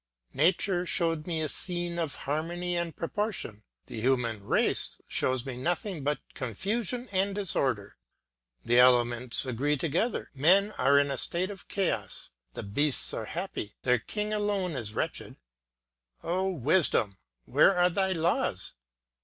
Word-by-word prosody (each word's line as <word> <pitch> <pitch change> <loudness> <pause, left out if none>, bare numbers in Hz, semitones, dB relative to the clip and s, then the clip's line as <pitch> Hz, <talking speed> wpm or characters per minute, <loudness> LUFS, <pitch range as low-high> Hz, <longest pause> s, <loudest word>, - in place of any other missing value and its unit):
Nature 175 +4 +2
showed 165 -3 -1
me 165 -2 -1
a - - 0
scene 175 +1 -2
of 155 -5 -2
harmony 170 +6 -3
and 170 -1 -2
proportion; 170 - -3 0.2
the 110 - -6
human 120 -4 0
race - - 0
shows 130 -1 0
me 130 -2 -5
nothing 170 - -2
but 145 +1 0 0.2
confusion 210 - -2
and 195 +1 0
disorder. 130 - -1 0.7
The 120 +1 +4
elements 120 0 +3
agree 135 +4 0
together; 170 - -1
men 185 +9 +4
are 140 +2 +5
in 140 0 +3
a 135 - -2
state 185 +3 -1
of 195 - -11
chaos. 115 - -2 0.2
The - - -5
beasts 140 +8 +4
are 110 - -3
happy; 165 - -5
their 125 -1 +3
king 210 - -3
alone 205 -3 0
is 110 -7 -4
wretched. - - -3 0.9
O 185 +3 0
Wisdom, 140 - +2 0.3
where 195 - +4
are 180 0 +4
thy 190 +1 +1
laws? 165 - 0
160 Hz, 140 wpm, -29 LUFS, 130-185 Hz, 0.9 s, are